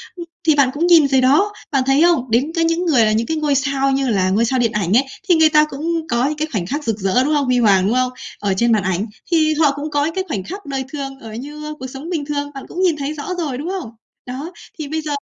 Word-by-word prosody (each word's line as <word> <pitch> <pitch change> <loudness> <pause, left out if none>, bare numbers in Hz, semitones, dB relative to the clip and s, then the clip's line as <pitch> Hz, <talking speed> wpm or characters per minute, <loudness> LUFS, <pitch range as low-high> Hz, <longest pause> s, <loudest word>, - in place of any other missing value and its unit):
Ừm, 345 -2 -7 0.2
thì 310 - +5
bạn 280 -3 +4
cũng 330 +4 0
nhìn 330 -5 +6
rồi 265 -1 +3
đó, 300 +11 +3 0.2
bạn 270 -3 +2
thấy 270 +2 +3
không? 320 -8 +2
Đến 260 +7 +2
cái 330 - +2
những 330 +2 0
người 265 -10 +4
là 215 - +2
những 225 +2 0
cái 320 - -1
ngôi 300 -2 +1
sao 275 0 +1
như 270 -1 0
là 190 -4 +1
ngôi 210 +5 +2
sao 255 +2 0
điện 230 -2 +1
ảnh 205 -1 +1
ấy, 265 - +4 0.3
thì 350 - +6
người 320 -1 +5
ta 300 0 +5
cũng 320 +3 -3
có 235 +2 +1
những 300 +1 -3
cái 310 +1 -1
khoảnh 195 -7 -2
khắc 290 - -3
rực 225 -5 -2
rỡ, 195 +6 +2
đúng 300 +3 0
không? 290 -2 +1
Huy 250 -1 +2
hoàng, 195 -5 +4
đúng 225 - +1
không? 255 0 +1 0.3
Ở 200 -2 0
trên 235 +3 +2
màn 215 -3 +2
ảnh 190 +2 -1 0.3
thì 310 -2 +3
họ 300 -2 +3
cũng 290 +2 -5
có 290 0 +1
những 325 - -3
cái 380 - -1
khoảnh 205 - -3
khắc 390 - -8
đời 270 -2 -3
thường 270 -2 -5
ở 225 -3 -10
như 300 +6 -7
cuộc 260 - -6
sống 270 +5 -8
bình 320 -5 -2
thường, 285 0 -3
bạn 270 - -7
cũng 360 - -5
nhìn 360 -4 +3
thấy 285 +1 -3
rõ 310 +4 -5
rồi, 295 -7 -3
đúng 300 +6 -5
không? 370 -10 -4 0.4
Đó, 270 +7 -6 0.3
thì 305 - -4
bây 315 +2 -3
giờ 305 -1 -5
280 Hz, 295 wpm, -19 LUFS, 245-310 Hz, 0.4 s, nhìn